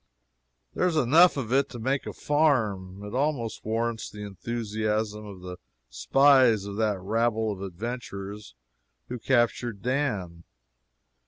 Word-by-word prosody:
There 180 - +1
is 175 - 0
enough 155 +6 +5
of 125 -3 -2
it 140 +1 +3
to 120 - -8
make 135 +4 -1
a - - -3
farm. 110 -11 0
It 105 - -8
almost 130 -4 -1
warrants 115 +1 -2
the 105 0 -9
enthusiasm 105 0 -3
of 95 -3 -10
the 90 0 -7 0.3
spies 130 -7 +4
of 100 0 -6
that 105 -3 +1
rabble 110 +2 0
of 95 -2 -6
adventurers 100 - -6 0.5
who 125 0 -5
captured 120 -3 0
Dan. 105 -11 -2
110 Hz, 135 wpm, -27 LUFS, 100-130 Hz, 0.5 s, enough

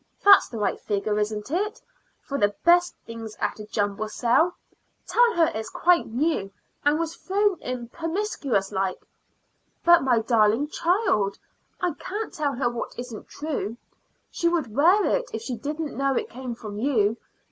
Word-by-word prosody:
That's 400 -1 +8
the 230 - -6
right 210 - -1
figure, 210 0 -1
isn't 210 +3 -3
it, 420 +7 -1 0.4
for 280 0 -3
the 205 0 +2
best 350 +1 +5
things 225 -2 -8
at - - -2
a 210 - -8
jumble 205 0 -1
sale? 245 +11 +2 0.5
Tell 480 -3 +3
her 330 -2 +3
it's 220 0 -4
quite 350 0 +3
new, 245 -4 0 0.3
and 290 +1 +3
was 330 0 -3
thrown 395 0 0
in 250 -1 -4
promiscuous 320 - -2
like." 190 -2 -2 0.8
"But, 345 0 +7
my 255 -3 +3
darling 225 +4 +2
child, 325 - +1 0.4
I 355 -3 +1
can't 425 +3 -5
tell 290 -3 -1
her 245 0 0
what 240 0 -4
isn't 245 -3 -7
true. 275 -7 -4 0.5
She 340 - 0
would 315 -11 -2
wear 355 +9 +5
it - - 0
if - - -5
she 250 - -3
didn't 295 +5 -4
know 275 -1 +1
it - - -2
came 250 -1 -6
from 210 -3 -7
you. 225 -4 +2
265 Hz, 165 wpm, -25 LUFS, 220-340 Hz, 0.8 s, That's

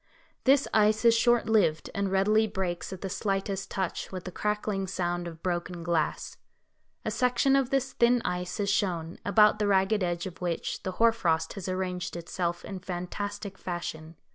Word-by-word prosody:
This 275 +1 +5
ice 215 +1 +3
is 230 0 +7
short 240 0 +3
lived, 175 -9 +2
and 200 -1 -1
readily 210 +3 +3
breaks 185 -4 -3
at 190 - -7
the 195 - -3
slightest 195 0 -2
touch, 190 -3 -3
with 185 -2 -5
the 185 - -6
crackling 210 -1 -1
sound 175 -2 -2
of 165 -1 -10
broken 175 -1 -2
glass. 165 -2 -1 0.7
A - - 0
section 250 +2 +2
of 270 -2 +2
this 265 -1 0
thin 240 +1 +4
ice 180 +3 -2
is 200 -1 +1
shown, 175 -5 -1
about 210 +1 +5
the 210 - +1
ragged 195 +1 +3
edge 175 -1 -1
of 185 -2 -8
which 175 -2 -2
the 185 - -4
hoar 230 +4 +4
frost 165 -8 0
has 195 -2 -5
arranged 185 -1 -3
itself 175 0 -3
in 195 -2 -6
fantastic 195 +3 -5
fashion. 165 -2 -5
190 Hz, 175 wpm, -28 LUFS, 175-215 Hz, 0.7 s, is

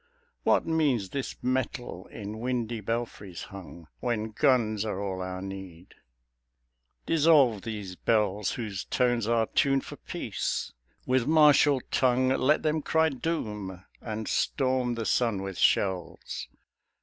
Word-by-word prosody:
What - - +3
means 145 - +1
this 135 -2 -3
metal 125 -6 -2
in 105 0 -7
windy 120 -2 -2
belfries 105 -5 -4
hung 90 -3 -10
When 110 -3 -2
guns 110 -5 +2
are 105 -3 -3
all 95 -2 -3
our 95 0 -5
need? 95 -3 -9 1.1
Dissolve 145 -9 +4
these 105 -4 -6
bells 105 -1 +1
Whose 105 -5 -4
tones 120 -3 +1
are 115 -1 +3
tuned 135 +3 +1
for - - -9
peace: - - -3 0.3
with 130 -1 +1
martial 150 -3 +5
tongue 130 0 +3
Let 135 +3 +2
them 155 0 +1
cry 160 +2 +2
doom 105 - -4 0.2
and 110 -1 -4
storm 130 -3 +1
the 115 -1 -3
sun 115 -6 +1
with 95 -1 -5
shells. 95 -4 0
115 Hz, 125 wpm, -28 LUFS, 100-130 Hz, 1.1 s, martial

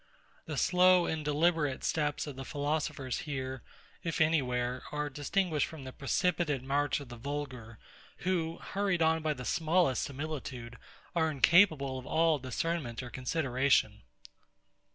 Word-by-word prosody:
The - - -4
slow 180 -1 +5
and 160 -1 -2
deliberate 150 -1 +1
steps 150 -2 0
of 135 -4 -7
philosophers 145 -2 -2
here, 130 -4 -4 0.4
if 165 - -3
any 160 -1 +4
where, 125 0 -2
are 150 0 -2
distinguished 150 +2 0
from 160 -4 -9
the 130 -1 -8
precipitate 150 -1 0
march 145 +2 +1
of 140 -4 -10
the 120 - -8
vulgar, 125 -4 -5 0.5
who, 170 -3 0
hurried 195 -4 0
on 160 0 +3
by 155 -1 0
the 125 - -7
smallest 165 -4 +2
similitude, 130 -5 -5 0.4
are 160 -2 +2
incapable 150 -3 +4
of 130 - -11
all 160 -2 +3
discernment 130 -1 -3
or 120 - -8
consideration. 130 0 +1
145 Hz, 135 wpm, -31 LUFS, 130-165 Hz, 0.5 s, slow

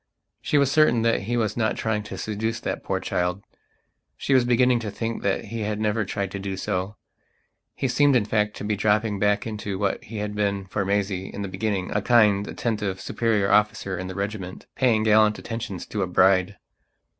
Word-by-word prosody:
She 150 - +1
was 140 -1 +3
certain 150 -7 +4
that 115 0 +2
he 120 +3 -1
was 110 -3 0
not 110 -2 0
trying 110 -1 -1
to - - -7
seduce 110 +2 -2
that - - -4
poor - - -1
child; 90 +2 -2 0.7
she 140 - 0
was 130 -2 +5
beginning 125 0 +3
to 110 -2 -4
think 115 +3 -4
that 100 -1 -1
he 115 - -3
had 105 0 -2
never 110 0 0
tried 100 -1 -3
to 100 - -5
do 95 -1 -4
so. 95 +2 -2 0.8
He 135 - -1
seemed 140 +2 +3
in 115 -4 +3
fact 105 0 0
to - - -7
be 105 0 0
dropping 105 0 +1
back 105 0 +2
into 105 -3 -4
what 100 -1 -1
he 110 +1 -7
had 105 0 -3
been 100 -2 -1
for 95 +2 -2
Maisie 100 -1 -1
in 100 - -6
the - - -3
beginninga 100 0 -2
kind, 105 -4 +4
attentive, 105 -5 -2
superior 105 -4 0
officer 105 -2 +2
in 90 +1 -5
the 95 - -7
regiment, 100 -2 -5
paying 115 -5 +2
gallant 110 0 +4
attentions 115 -6 -5
to 105 - -4
a 95 - 0
bride. 95 +2 +3
105 Hz, 200 wpm, -24 LUFS, 100-115 Hz, 0.8 s, was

